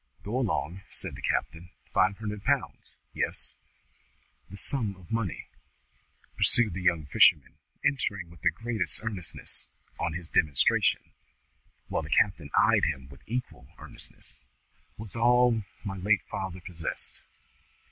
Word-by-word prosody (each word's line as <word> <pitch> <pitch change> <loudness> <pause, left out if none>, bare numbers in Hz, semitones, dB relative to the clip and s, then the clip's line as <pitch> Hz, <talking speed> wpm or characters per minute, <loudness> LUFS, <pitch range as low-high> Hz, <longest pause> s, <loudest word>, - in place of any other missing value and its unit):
"Go 115 +6 -2
along," 95 - -1
said - - -1
the - - -9
captain. 85 +2 -2 0.2
"Five 95 +2 +3
hundred 105 -2 -5
pounds? - - -1 0.2
Yes?" - - -2 1.0
"That 100 - -9
sum 110 -5 +3
of 95 0 -16
money," 115 -7 -2 0.9
pursued 115 -6 +5
the 95 - -4
young 85 -4 +2
fisherman, 75 0 +4 0.3
entering 100 -10 -1
with 85 - -16
the - - +4
greatest 115 -2 +1
earnestness 100 -7 -4 0.3
on 85 -1 -1
his 85 0 -5
demonstration, 75 -4 +2 0.8
while - - -1
the - - -8
captain 90 -8 +2
eyed - - +5
him 65 -3 -3
with 70 0 -14
equal 115 - -5
earnestness, - - -8 0.5
"was 110 -1 -9
all 120 0 +4 0.2
my 95 -2 -4
late 100 +2 +2
father 95 -1 -5
possessed. 85 -2 -4
95 Hz, 130 wpm, -28 LUFS, 85-110 Hz, 1.0 s, pursued